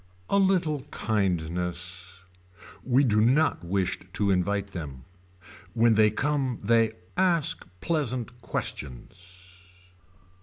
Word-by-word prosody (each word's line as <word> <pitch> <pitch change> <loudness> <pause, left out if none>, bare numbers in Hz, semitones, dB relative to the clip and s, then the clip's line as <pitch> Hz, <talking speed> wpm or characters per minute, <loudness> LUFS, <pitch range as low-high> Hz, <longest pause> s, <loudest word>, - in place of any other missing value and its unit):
A 200 - +4
little 180 -7 +2
kindness. 90 -2 -2 0.6
We 130 +2 +3
do 105 -5 +3
not 135 - +3
wish 95 +1 -1
to 100 -1 +1
invite 100 +2 0
them. 70 -8 -7 0.7
When 115 0 +5
they 110 0 +5
come 135 +1 -1
they 115 +1 +3 0.2
ask 175 - +1
pleasant 125 -6 -2
questions. 90 - -7
105 Hz, 100 wpm, -27 LUFS, 90-130 Hz, 0.7 s, When